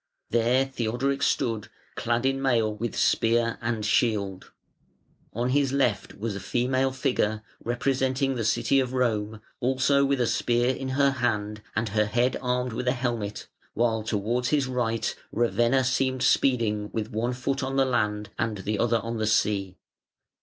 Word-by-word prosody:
There 120 +3 +3
Theodoric 135 +2 -2
stood, 115 -3 0 0.3
clad 120 +2 -1
in 135 0 +1
mail, 115 -5 +2
with 115 +2 -4
spear 115 0 +2
and 115 -2 -2
shield. 105 -5 0 0.8
On 120 +3 -1
his 135 0 +2
left 130 -6 0
was 105 0 -3
a - - -4
female 125 +7 0
figure 110 -4 -1 0.2
representing 130 +2 0
the 120 -3 -2
City 110 +5 +2
of 130 -1 -1
Rome, 110 -4 -1 0.2
also 130 +2 +2
with 140 -1 +1
a 120 - +3
spear 120 +2 +1
in 135 +1 -5
her 140 -1 +4
hand 105 -5 -1
and 110 0 0
her 105 +1 +2
head 120 +4 +1
armed 125 -1 -1
with 125 +2 -4
a 125 - +4
helmet, 120 -5 -3 0.3
while 115 -1 +1
towards 110 +4 -1
his 145 -3 +2
right 120 -3 -1 0.2
Ravenna 120 +2 +2
seemed 130 0 0
speeding 110 -5 +2
with 110 +1 -3
one 120 +3 -1
foot 135 +2 -2
on 135 0 -2
the 135 -1 +4
land 105 -4 -1
and 110 -2 -1
the 100 +2 -3
other 115 0 +3
on 115 0 -4
the 110 -1 -1
sea. 100 -3 +1
120 Hz, 160 wpm, -26 LUFS, 110-130 Hz, 0.8 s, her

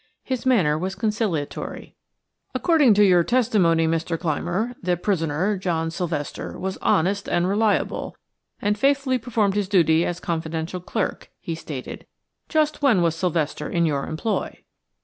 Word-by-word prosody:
His 260 -1 -3
manner 165 -12 +3
was 190 +2 -3
conciliatory. 205 -7 -3 0.6
"According 300 - +4
to 210 - +5
your 180 -3 +5
testimony, 200 -9 +2
Mr. 165 0 -1
Clymer, 180 +9 -2
the 180 -1 0
prisoner, 180 +1 0
John 165 -3 -1
Sylvester, 165 -4 -4
was 190 0 -4
honest 195 +5 +1
and 175 +1 +1
reliable, 210 +1 0 0.4
and 205 +1 +1
faithfully 275 0 +2
performed 220 -4 0
his 205 -2 -1
duties 165 -4 +3
as 175 0 -3
confidential 165 +1 -3
clerk," 195 +3 -3
he 165 - -4
stated. 150 -5 -7 0.4
"Just 310 -2 +1
when 235 -11 +4
was 165 -2 +2
Sylvester 165 -3 -1
in 170 -1 +1
your 140 -3 -1
employ?" 170 +8 -2
180 Hz, 140 wpm, -23 LUFS, 165-215 Hz, 0.6 s, to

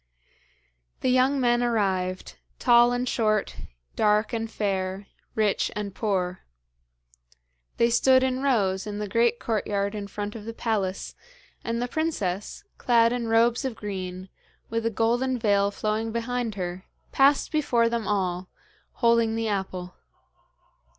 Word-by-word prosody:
The 255 - +2
young 260 +2 +3
men 240 -1 +2
arrived 190 -6 -1 0.2
tall 240 0 +5
and 245 +1 -1
short, 215 -4 0 0.4
dark 210 +1 +2
and 225 -1 -2
fair, 195 -2 -2 0.3
rich 215 -2 +1
and 205 -2 -4
poor. 185 -4 -1 1.4
They 235 0 +3
stood 260 +2 +4
in 260 0 0
rows 205 -8 +1
in 205 -1 -4
the 210 0 -3
great 235 +3 +2
courtyard 200 -2 -1
in 205 -1 -5
front 205 +1 -5
of 215 -2 -8
the 230 0 -6
palace, 200 -5 -2 0.5
and 230 0 -2
the 245 - -1
princess, 215 - -2 0.2
clad 230 -1 +4
in 240 -2 -2
robes 230 +1 +3
of 260 -4 -3
green, 185 -3 -6 0.4
with 230 0 0
a - - +2
golden 240 +4 +1
veil 200 -3 +2
flowing 215 +2 -2
behind 235 -1 -2
her, 180 -1 -5 0.3
passed 275 +1 +3
before 245 -7 +2
them 230 -2 -2
all, 185 -3 -1 0.6
holding 230 -1 +4
the 225 0 -1
apple. 185 -3 -3
220 Hz, 135 wpm, -26 LUFS, 200-240 Hz, 1.4 s, tall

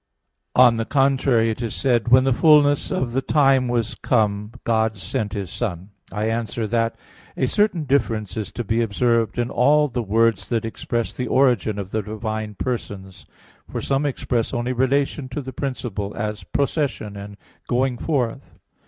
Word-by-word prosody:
On 125 -2 +6
the 115 - -1
contrary, 135 -4 +2
It 110 - -6
is 115 -3 -3
said 120 -4 +1
(Gal. - - -17
4:4): - - -2
"When 130 0 +7
the 135 -1 +2
fullness 145 0 +4
of 125 -2 -1
the 135 +3 0
time 135 -3 +3
was 120 -2 -1
come, 105 -3 0
God 110 -1 +1
sent 105 +3 -3
His 100 -5 -4
Son." 95 -4 -4 0.2
I 105 +2 -2
answer 115 0 -2
that, 115 +1 0 0.4
A - - +2
certain 190 +2 +1
difference 115 -7 0
is 110 -2 -4
to 120 - -3
be 115 +2 0
observed 115 +1 +1
in 120 0 -1
all 150 +4 +4
the 125 -1 -2
words 110 -1 +1
that 115 -2 0
express 115 +1 -3
the 125 - -3
origin 120 -6 +2
of 100 -1 -5
the 110 - 0
divine 110 0 -4
persons. 100 -6 -5 0.4
For - - -4
some 140 +1 0
express 125 -3 -2
only 120 +2 -1
relation 135 +2 0
to 130 - -4
the 130 0 -7
principle, 115 -7 -4
as 105 -3 -4
"procession" 135 - -2
and 100 0 -9 0.3
"going 125 0 0
forth." 125 - -2
115 Hz, 175 wpm, -22 LUFS, 110-130 Hz, 0.4 s, When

